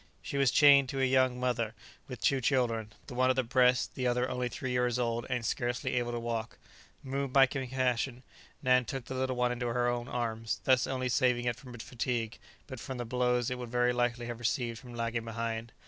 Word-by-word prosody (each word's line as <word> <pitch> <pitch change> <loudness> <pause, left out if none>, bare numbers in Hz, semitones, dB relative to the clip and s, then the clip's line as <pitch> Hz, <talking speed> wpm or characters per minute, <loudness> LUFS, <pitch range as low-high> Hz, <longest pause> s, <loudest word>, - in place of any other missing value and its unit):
She 140 - -4
was 135 -2 +4
chained 140 -2 +6
to 135 - -3
a 135 - +3
young 130 -1 +2
mother 120 -3 -1 0.3
with 125 -3 -8
two 135 -2 +2
children, 115 -4 +1
the 135 - -9
one 130 +1 +2
at 130 - +3
the 130 - +1
breast, 125 +1 +3
the 130 -1 -1
other 125 +1 +1
only 125 -1 -2
three 130 +1 -4
years 125 -1 +1
old, 120 -1 -1
and 125 -3 -1
scarcely 120 +3 -1
able 120 -1 0
to 120 - -3
walk. 115 -1 -4 0.5
Moved 135 0 -3
by 135 -1 +7
compassion, 130 -1 -1 0.4
Nan 125 0 +4
took 135 0 -5
the - - -6
little 130 0 -1
one 125 0 +1
into 125 0 -2
her 120 +1 +1
own 120 0 -1
arms, 115 -4 -2
thus 130 -1 +3
not 135 - -2
only 130 0 -1
saving 125 -2 +2
it 120 -1 0
from 125 0 -11
fatigue, 115 -1 -3 0.3
but 130 -4 -8
from 130 +3 -6
the 120 - -4
blows 125 0 +1
it 125 - -3
would 120 -1 -6
very 125 +1 +2
likely 120 -1 0
have 120 -1 -5
received 120 -1 -1
for 125 - -13
lagging 115 -1 -2
behind. 115 0 -4
125 Hz, 220 wpm, -31 LUFS, 120-130 Hz, 0.5 s, by